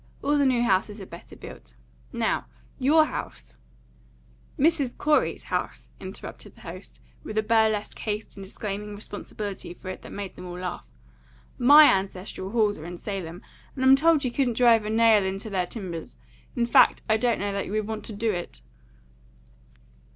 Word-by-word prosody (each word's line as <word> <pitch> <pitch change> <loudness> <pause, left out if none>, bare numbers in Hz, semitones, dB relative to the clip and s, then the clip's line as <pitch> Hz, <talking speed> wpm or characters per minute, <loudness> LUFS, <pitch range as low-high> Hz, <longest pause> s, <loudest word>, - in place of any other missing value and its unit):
All 290 +1 +2
the 285 -2 +3
new 245 -2 +2
houses 205 0 +1
are 195 - -7
better 170 -1 -12
built. - - -12 0.4
Now, - - -1 0.3
your 310 +4 +5
house 280 - -7 0.5
" - - -30
"Mrs. 290 -7 0
Corey's 300 0 +1
house," - - -4
interrupted - - -9
the - - -18
host, - - -10 0.2
with 215 - -6
a 215 - +3
burlesque 220 -1 +1
haste 210 0 -4
in 200 - -9
disclaiming 205 +1 -6
responsibility 205 -3 -6
for 185 - -9
it 185 - -6
that - - -11
made 200 -2 -6
them 180 - -9
all 175 0 -7
laugh. 180 0 -6 0.7
"My 290 +5 +9
ancestral 190 -2 0
halls 210 -3 +1
are 155 - -9
in 175 0 -7
Salem, 180 -3 -6 0.3
and 260 -1 -1
I'm 265 +1 +8
told 310 0 +3
you 250 - 0
couldn't 245 -3 0
drive 230 -3 +5
a - - -3
nail 220 -2 +5
into 195 +3 -4
their 185 -2 0
timbers; 180 -7 -7 0.4
in 240 -2 +1
fact, 235 - +5
I 220 -1 +3
don't 235 +1 +1
know 200 0 -2
that 200 - -2
you - - -7
would 215 -1 0
want 220 0 -5
to 220 - -6
do 220 +2 0
it." 175 -3 -6
210 Hz, 180 wpm, -26 LUFS, 190-240 Hz, 0.7 s, My